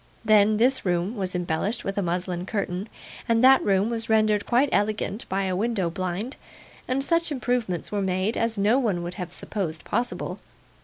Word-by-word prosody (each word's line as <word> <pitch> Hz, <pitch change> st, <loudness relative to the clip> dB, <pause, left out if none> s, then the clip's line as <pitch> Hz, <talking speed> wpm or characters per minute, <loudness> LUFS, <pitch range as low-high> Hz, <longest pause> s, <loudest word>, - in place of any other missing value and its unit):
Then, 215 Hz, 0 st, +5 dB
this 255 Hz, +4 st, +3 dB
room 180 Hz, +4 st, 0 dB
was 190 Hz, -3 st, -3 dB
embellished 180 Hz, +6 st, -1 dB
with 195 Hz, -, -3 dB
a 200 Hz, -, 0 dB
muslin 180 Hz, 0 st, -2 dB
curtain, 200 Hz, -1 st, -3 dB, 0.4 s
and 230 Hz, +1 st, +3 dB
that 265 Hz, +1 st, +7 dB
room 200 Hz, +3 st, +2 dB
was 225 Hz, -1 st, -2 dB
rendered 215 Hz, -2 st, +2 dB
quite 255 Hz, +4 st, +3 dB
elegant 210 Hz, +1 st, -1 dB
by 195 Hz, +1 st, 0 dB
a 185 Hz, -1 st, -1 dB
window 200 Hz, -4 st, 0 dB
blind, 185 Hz, -, -3 dB, 0.5 s
and 260 Hz, +2 st, +1 dB
such 335 Hz, +1 st, +1 dB
improvements 245 Hz, -, -1 dB
were 205 Hz, -1 st, -1 dB
made, 190 Hz, +3 st, 0 dB
as 230 Hz, -1 st, 0 dB
no 210 Hz, +6 st, +3 dB
one 200 Hz, -9 st, 0 dB
would 175 Hz, +1 st, -5 dB
have 175 Hz, -1 st, -5 dB
supposed 175 Hz, -4 st, -4 dB
possible. 240 Hz, +4 st, -2 dB
205 Hz, 175 wpm, -25 LUFS, 185-230 Hz, 0.5 s, that